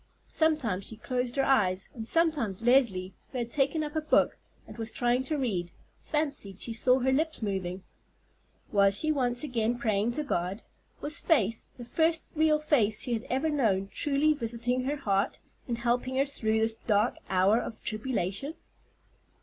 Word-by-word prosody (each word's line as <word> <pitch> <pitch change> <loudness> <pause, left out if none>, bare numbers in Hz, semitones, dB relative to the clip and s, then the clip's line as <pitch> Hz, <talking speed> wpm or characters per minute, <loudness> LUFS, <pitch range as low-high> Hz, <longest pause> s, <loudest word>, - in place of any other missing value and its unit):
Sometimes 275 - +1
she 225 - -5
closed 250 +1 -2
her 275 - +2
eyes, 195 -9 +2
and 225 -2 -5
sometimes 285 - +1
Leslie, 225 -7 +3 0.2
who 260 - -5
had 235 -1 -3
taken 295 +2 +1
up 300 +1 -6
a 315 - +1
book, 305 - +3 0.3
and - - -10
was 225 0 -3
trying 245 +2 +1
to 305 +3 -1
read, 195 -10 -1 0.3
fancied 280 -11 -2
she 230 - -1
saw 250 +3 +3
her 265 0 +1
lips 315 -1 0
moving. 190 -2 -3 0.9
Was 200 -1 +4
she 310 - +1
once 245 -3 +1
again 240 -4 0
praying 220 -1 0
to 300 - -1
God? 185 -5 -2 0.4
Was 300 +2 +1
faith, 230 - +1
the 240 - -8
first 320 +5 +1
real 310 0 +4
faith 245 -9 +1
she 245 - -1
had 225 -1 -3
ever 280 +5 0
known, 200 -9 +1
truly 295 +1 +2
visiting 245 -1 -1
her 290 +2 -1
heart, 200 -6 0 0.3
and 235 -2 -2
helping 245 +2 0
her 270 +1 +3
through 220 -6 -1
this 225 0 +2
dark 215 0 +1
hour 190 +4 +4
of 225 - -6
tribulation? 215 - -2
240 Hz, 170 wpm, -29 LUFS, 215-285 Hz, 0.9 s, Was